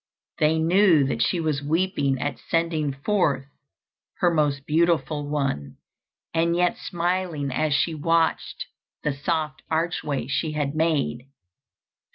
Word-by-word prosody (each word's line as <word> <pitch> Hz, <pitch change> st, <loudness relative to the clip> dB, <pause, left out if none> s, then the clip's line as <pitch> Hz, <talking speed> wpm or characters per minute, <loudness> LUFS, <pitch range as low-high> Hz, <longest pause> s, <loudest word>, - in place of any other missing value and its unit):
They 155 Hz, +1 st, +3 dB
knew 170 Hz, -1 st, +4 dB
that 135 Hz, -, -1 dB
she 180 Hz, -, +1 dB
was 155 Hz, -4 st, -1 dB
weeping 145 Hz, -3 st, 0 dB
at 145 Hz, +2 st, -3 dB
sending 165 Hz, -3 st, 0 dB
forth 140 Hz, -1 st, 0 dB, 0.7 s
her 175 Hz, -1 st, +2 dB
most 145 Hz, -3 st, +1 dB
beautiful 150 Hz, -3 st, +1 dB
one, 135 Hz, -, -2 dB, 0.6 s
and 165 Hz, +1 st, +2 dB
yet 180 Hz, 0 st, +2 dB
smiling 175 Hz, -5 st, -2 dB
as 155 Hz, +4 st, 0 dB
she 165 Hz, -, +1 dB
watched 165 Hz, +2 st, 0 dB, 0.4 s
the 150 Hz, -, 0 dB
soft 150 Hz, +2 st, -2 dB
archway 160 Hz, -5 st, -1 dB
she 150 Hz, +4 st, -1 dB
had 145 Hz, -2 st, -1 dB
made. 155 Hz, -6 st, 0 dB
155 Hz, 125 wpm, -24 LUFS, 140-170 Hz, 0.7 s, knew